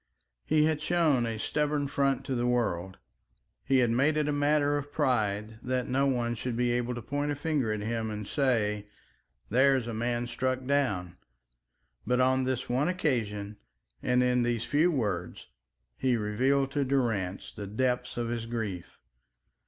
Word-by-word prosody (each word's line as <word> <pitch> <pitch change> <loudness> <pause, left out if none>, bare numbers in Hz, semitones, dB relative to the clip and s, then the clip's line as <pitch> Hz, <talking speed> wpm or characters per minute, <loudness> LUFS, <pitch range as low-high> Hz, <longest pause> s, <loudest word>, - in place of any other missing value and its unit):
He 155 -1 +4
had 155 -1 0
shown 155 -7 +2
a 115 -1 -3
stubborn 150 +4 0
front 140 -1 0
to 135 - -2
the 120 -1 0
world; 95 -7 -1 0.7
he 135 - +2
had 115 - 0
made 140 +6 +2
it 150 -1 +1
a - - +1
matter 145 0 +2
of 145 0 -4
pride 110 -7 0
that 125 0 -1
no 135 +2 +2
one 120 -3 0
should 120 +1 -3
be 120 0 +2
able 120 0 -1
to 120 - -6
point 145 +4 -2
a - - -1
finger 145 -5 0
at 105 -1 -2
him 110 +1 -2
and 105 -1 -5
say, 105 -7 0 0.6
"There's 130 +1 +4
a 115 - -4
man 120 +2 -1
struck 130 +1 -2
down." 100 -11 0 0.9
But 125 0 +2
on 130 0 +3
this 130 -1 -2
one 130 +5 +1
occasion 110 - -1 0.4
and 125 0 +2
in 125 0 +2
these 120 -1 0
few 150 +7 +3
words 105 - -2 0.5
he 125 -2 +2
revealed 130 +6 +1
to 145 0 +1
Durrance 115 -9 -1
the 105 -2 -6
depth 125 +3 -1
of 120 -1 -1
his 115 -1 -3
grief. 110 -7 -4
125 Hz, 170 wpm, -29 LUFS, 110-140 Hz, 0.9 s, He